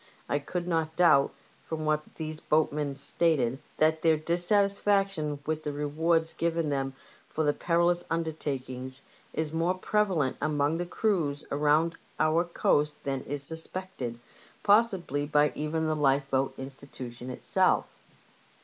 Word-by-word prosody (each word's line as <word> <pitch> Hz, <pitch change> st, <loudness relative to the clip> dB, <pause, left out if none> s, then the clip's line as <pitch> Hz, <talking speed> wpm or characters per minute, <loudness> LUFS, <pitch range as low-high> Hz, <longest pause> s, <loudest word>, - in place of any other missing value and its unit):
I 145 Hz, -, +1 dB
could 175 Hz, +5 st, -4 dB
not 160 Hz, -2 st, 0 dB
doubt, 165 Hz, -6 st, +5 dB, 0.4 s
from 155 Hz, -1 st, -3 dB
what 155 Hz, 0 st, -1 dB
these 155 Hz, -1 st, -5 dB
boatmen 150 Hz, -2 st, +1 dB
stated, 135 Hz, -3 st, +2 dB, 0.2 s
that 155 Hz, 0 st, +3 dB
their 160 Hz, -1 st, +4 dB
dissatisfaction 195 Hz, -1 st, +1 dB
with 155 Hz, 0 st, -1 dB
the 150 Hz, -, -3 dB
rewards 160 Hz, +3 st, 0 dB
given 165 Hz, -2 st, 0 dB
them 135 Hz, -1 st, -2 dB, 0.3 s
for 160 Hz, -, -1 dB
their 145 Hz, -1 st, +3 dB
perilous 175 Hz, +1 st, +2 dB
undertakings 135 Hz, -5 st, -3 dB, 0.3 s
is 155 Hz, -1 st, -1 dB
more 170 Hz, +3 st, +1 dB
prevalent 185 Hz, -9 st, +1 dB
among 150 Hz, +1 st, +1 dB
the 175 Hz, -, -2 dB
crews 170 Hz, -8 st, 0 dB
around 150 Hz, +3 st, +2 dB, 0.2 s
our 155 Hz, +2 st, +3 dB
coast 150 Hz, -3 st, +1 dB
than 135 Hz, -1 st, -2 dB
is 145 Hz, 0 st, -3 dB
suspected, 160 Hz, -5 st, -5 dB, 0.4 s
possibly 190 Hz, -, +3 dB
by 150 Hz, 0 st, +3 dB
even 155 Hz, +2 st, -2 dB
the 155 Hz, 0 st, +1 dB
Lifeboat 135 Hz, -2 st, +1 dB
Institution 130 Hz, -2 st, -8 dB
itself. 125 Hz, -, +2 dB
155 Hz, 130 wpm, -29 LUFS, 140-170 Hz, 0.4 s, doubt